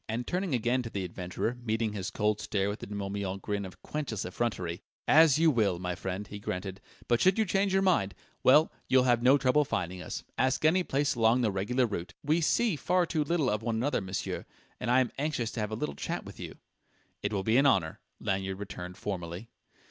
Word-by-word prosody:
And 115 +2 -2
turning 180 -5 -1
again 120 +2 +1
to 115 - -6
the 100 -3 -3
adventurer, 90 +7 -3
meeting 110 -1 0
his 95 -3 -3
cold 105 -1 0
stare 100 -1 0
with 105 - -4
the - - -7
De 105 - -6
Morbihan 100 -1 -3
grin 100 0 -3
of 90 - -15
quenchless 140 -9 -3
effrontery 90 -4 -2 0.3
"As 155 -2 +6
you 165 0 +5
will, 105 -8 +2
my 90 0 -3
friend!" 95 +2 -4
he 105 0 -8
granted. 95 0 -5 0.3
"But 120 -1 +2
should 185 +2 +4
you 220 - +3
change 195 0 +1
your 195 0 +3
mind 100 - +2 0.3
well, 150 +5 +6 0.2
you'll 130 -1 +5
have 120 -2 +3
no 130 +3 +6
trouble 135 +2 +3
finding 90 -8 -3
us. - - -5 0.2
Ask 130 +3 +2
any 175 +4 +5
place 145 -4 0
along 115 +1 +3
the 110 -4 +2
regular 105 +7 +1
route. 90 -5 -5
We 155 +4 +2
see 215 +4 +2
far 180 +4 +1
too 160 -2 0
little 155 -2 +1
of 105 -2 0
one 115 0 -1
another, 125 +2 0
monsieur 95 0 -4 0.3
and - - -3
I 125 +2 +5
am - - +3
most - - -27
anxious 140 -6 -1
to - - -5
have 105 -1 -1
a 110 - -3
little 90 -10 -3
chat - - -4
with - - -11
you." - - -7 0.6
"It 105 - -1
will 100 -2 -1
be 110 +4 +3
an 140 +1 +5
honour," 90 -11 +2 0.2
Lanyard 95 0 -2
returned 90 -2 -7
formally.... 90 +2 -5
110 Hz, 225 wpm, -30 LUFS, 95-140 Hz, 0.6 s, As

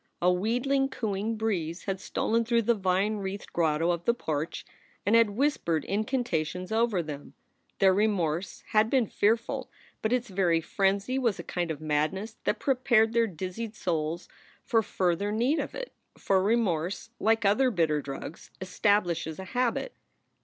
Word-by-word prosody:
A 180 +1 +3
wheedling, 250 +8 +1
cooing 220 -3 -2
breeze 180 -6 -2
had 195 -1 -3
stolen 225 +3 0
through 235 0 +2
the 235 - +3
vine 195 +1 +1
wreathed 195 0 -6
grotto 165 0 +2
of 170 0 -3
the 235 - +3
porch, 155 -7 -3 0.4
and 205 +3 +4
had 230 -2 +6
whispered 205 - 0
incanta 215 - 0
tions 180 +4 -7
over 220 -5 +2
them. 145 -2 -8 0.4
Their 190 -1 +5
remorse 185 -4 0
had 215 +1 +3
been 260 -2 +3
fearful, 230 +6 0 0.3
but 220 - 0
its 250 0 +1
very 180 -3 +2
frenzy 200 +8 0
was 235 -7 +1
a - - -6
kind 175 -2 -3
of 155 -3 -3
madness 155 +8 -1
that - - +1
prepared 240 -4 +3
their 230 -1 +3
dizzied 190 +5 -5
souls 165 -2 -2 0.4
for 225 - +2
further 190 0 0
need 245 +9 +1
of - - -4
it. - - -6 0.2
For 190 -1 +2
remorse, 200 -2 0
like 225 0 +2
other 255 +7 +4
bitter 160 -8 +1
drugs, 140 +3 -8
establishes 180 -4 0
a 190 - -7
habit. 250 - 0
200 Hz, 160 wpm, -28 LUFS, 175-230 Hz, 0.4 s, had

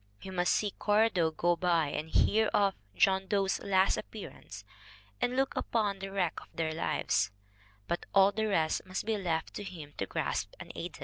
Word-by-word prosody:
He 190 - -9
must 180 -1 +1
see 205 -2 0
Cora 215 +3 +2
Doe 170 -4 +2
go 175 +2 +1
by 170 -4 +2
and 155 +2 -4
hear 220 +6 +3
of 200 -1 +3 0.2
John 190 - +3
Doe's 195 -1 +1
last 190 -1 +3
appear - - -7
ance - - -11 0.6
and 245 0 +1
look 270 +1 +1
upon 205 -4 0
the 195 0 -6
wreck 185 -4 0
of - - -14
their 160 -1 -1
lives 160 - 0 0.6
but 170 - -2
all 195 0 +6
the 220 +2 -1
rest 160 -6 +1
must 185 - -3
be 220 0 +1
left 170 -5 -2
to - - -5
him 160 -7 -9
to 100 - -1
grasp - - -2
unaided! - - -7
190 Hz, 190 wpm, -31 LUFS, 165-205 Hz, 0.6 s, all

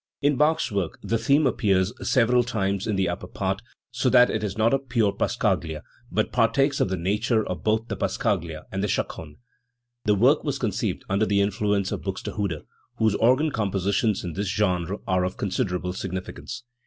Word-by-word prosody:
In 145 0 +2
Bach's 150 -2 +2
work 100 -4 -2
the 110 +3 0
theme 140 +6 +3
appears 105 -5 +2 0.2
several 125 -1 +4
times 100 -4 -1
in 105 - 0
the 95 -1 +1
upper 90 +1 -4
part, 95 +2 -2 0.3
so 125 +1 +1
that 125 -1 +6
it 110 - -2
is 100 -1 -3
not 110 +2 +3
a 135 - +3
pure 120 -6 +1
passacaglia, 80 -5 -1 0.3
but 110 - 0
partakes 135 +4 +2
of - - +2
the 95 - -1
nature 105 +5 0
of 90 - -4
both 110 +1 +1
the - - -3
passa - - -2
caglia 80 -2 -1
and 95 +1 -2
.the - - +1
chaconne. 75 -5 -3 0.7
The 105 - +4
work 130 +9 +4
was 140 -2 -1
conceived 110 -5 -2
under 100 +3 +1
the 100 -1 +2
influence 100 -1 0
of - - -3
Buxte 95 -1 -4
hude, 100 -8 -2 0.3
whose 110 -2 +3
organ 130 +9 +3
compositions 100 -1 0
in 85 -2 -4
this 100 +3 -2
genre 95 -2 0
are 90 -1 +1
of 90 +1 -3
con 100 - -2
siderable 90 -3 -2
significance. 95 +6 -6
105 Hz, 190 wpm, -25 LUFS, 95-115 Hz, 0.7 s, that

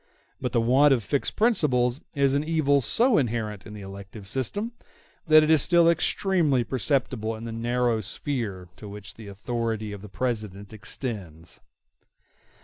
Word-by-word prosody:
But - - -2
the - - +2
want 135 +4 +5
of 120 - -4
fixed 140 +7 -1
principles 140 - +2
is 140 -1 +2
an 140 +1 +1
evil 155 -3 +2
so 235 - +3
inherent 110 -5 -3
in 105 - -9
the 105 - -9
elective 100 +1 -10
system 200 - 0 0.6
that 155 0 +7
it 155 - +2
is 155 -3 +5
still 170 +2 +4
extremely 170 -5 +2
perceptible 125 -3 -1
in 110 - -9
the 115 - -5
narrow 120 0 0
sphere 105 -4 -4
to 105 - -9
which 105 0 -9
the 110 -2 -12
authority 110 +1 -3
of 100 -1 -8
the 105 - -10
President 105 -3 -4
extends. 100 - -6
120 Hz, 155 wpm, -26 LUFS, 105-145 Hz, 0.6 s, that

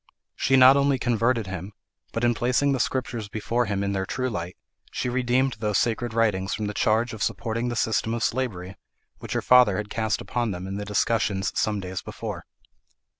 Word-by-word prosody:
She 135 - +2
not 130 +1 +8
only 140 -1 +2
converted 115 -1 +1
him, 95 +1 -6 0.4
but 115 - -3
in 120 0 +4
placing 125 +4 +1
the 135 - 0
Scriptures 120 -5 -2
before 115 +3 -1
him 100 -1 -1
in 100 - -1
their 95 -1 -2
true 130 0 -2
light, 90 -3 -5 0.3
she 125 - -2
redeemed 125 0 +1
those 105 -2 0
sacred 120 0 0
writings 105 -4 +1
from 110 - -3
the 105 - -3
charge 110 +3 +1
of 110 - -8
supporting 115 +3 -1
the 120 - -3
system 115 0 0
of 115 - -2
slavery, 100 -7 -2 0.4
which - - -6
her - - -1
father 125 -7 +6
had 105 0 -5
cast 110 -2 -1
upon 120 -2 -2
them 90 -2 -5
in 95 +1 -4
the 105 - -4
discussion 105 -1 0
some 105 +1 0
days 95 -1 -5
before. - - -7
115 Hz, 195 wpm, -25 LUFS, 100-120 Hz, 0.4 s, not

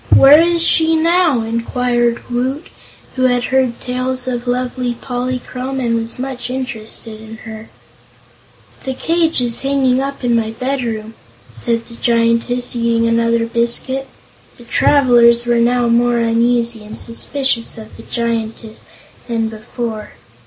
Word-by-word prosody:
"Where 285 +3 +8
is 340 0 +3
she 325 -1 +3
now?" 330 -5 +2
inquired 235 +1 -1
Woot, 260 +5 -2 0.5
who 255 -1 +1
had 245 -1 +2
heard 255 -2 0
tales 255 0 -3
of 245 -1 -3
lovely 250 0 -2
Polychrome 255 +1 -4
and 235 -3 0
was 230 0 -2
much 260 -1 -5
interested 225 -3 -5
in 220 0 -10
her. 220 0 -9 1.1
"The 265 -1 -4
cage 330 -1 +1
is 240 -1 -1
hanging 270 -2 +1
up 275 0 -5
in 240 -1 +2
my 225 -1 0
bedroom," 235 -5 -3 0.4
said 230 - -2
the 235 - -12
Giantess, 235 +1 +1
eating 230 -1 +1
another 230 0 +1
biscuit. 235 +3 -1 0.5
The 240 - -14
travelers 240 -2 +4
were 240 0 +2
now 240 +1 +2
more 240 +1 +2
uneasy 230 0 +1
and 215 +1 -9
suspicious 235 0 +1
of 220 -1 -11
the - - -11
Giantess 225 -1 -4 0.4
than 225 -2 -1
before. 220 0 -6
240 Hz, 135 wpm, -16 LUFS, 230-260 Hz, 1.1 s, Where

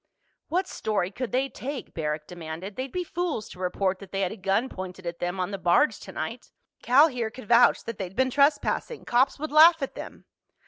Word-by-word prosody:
"What 370 +3 0
story 200 -4 -2
could 250 +3 -5
they 260 +2 +1
take?" 270 0 -7
Barrack 150 -1 -3
demanded. 175 +3 -7
"They'd 260 0 -4
be 360 - -2
fools 340 -10 -3
to - - -12
report 185 +1 -1
that 195 -2 -12
they 195 - -2
had 185 - 0
a - - -6
gun 195 +4 0
pointed 185 -4 -8
at 170 0 -5
them 180 +2 -3
on 185 +2 -1
the 195 - -4
barge 180 +13 +3
tonight. - - -6 0.3
Cal 275 +6 +6
here 245 -6 -3
could 240 -1 -12
vouch 235 +2 +5
that 230 -3 -6
they'd 190 -1 -5
been 260 +2 +2
trespassing. 290 - +1
Cops 260 +3 +2
would 310 +1 -5
laugh 325 +2 +8
at 270 - -4
them." - - -9
220 Hz, 210 wpm, -26 LUFS, 185-275 Hz, 0.3 s, laugh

